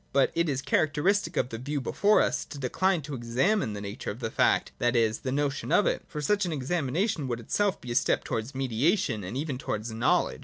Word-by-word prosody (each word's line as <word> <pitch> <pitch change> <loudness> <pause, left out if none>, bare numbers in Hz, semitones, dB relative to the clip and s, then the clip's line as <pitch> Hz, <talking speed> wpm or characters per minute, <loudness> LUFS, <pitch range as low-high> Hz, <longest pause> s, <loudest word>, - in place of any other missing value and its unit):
But 140 -1 +3
it 170 -1 +1
is 135 -1 -1
characteristic 155 +9 +1
of 125 - +1
the 115 - -6
view 145 +4 -2
before 205 +10 +3
us - - 0
to - - -9
decline 165 +6 0
to 150 0 -7
examine 125 - 0
the 100 - -6
nature 100 +3 -5
of 105 - -5
the 115 -3 -3
fact, - - +2
that 120 +1 +1
is, 110 -2 +2
the 130 - -3
notion 140 0 -1
of 205 - +4
it; - - 0
for 150 - -5
such 205 +7 +1
an 175 - -1
exami 145 0 -1
nation 165 - 0
would 120 -2 -2
itself 200 - 0
be 125 - -7
a - - 0
step - - +2
towards 115 +2 -4
mediation 130 - +1
and 95 +8 -5
even 140 -3 -3
towards 110 -2 -3
knowledge. 110 +1 +1
135 Hz, 230 wpm, -28 LUFS, 120-165 Hz, -, of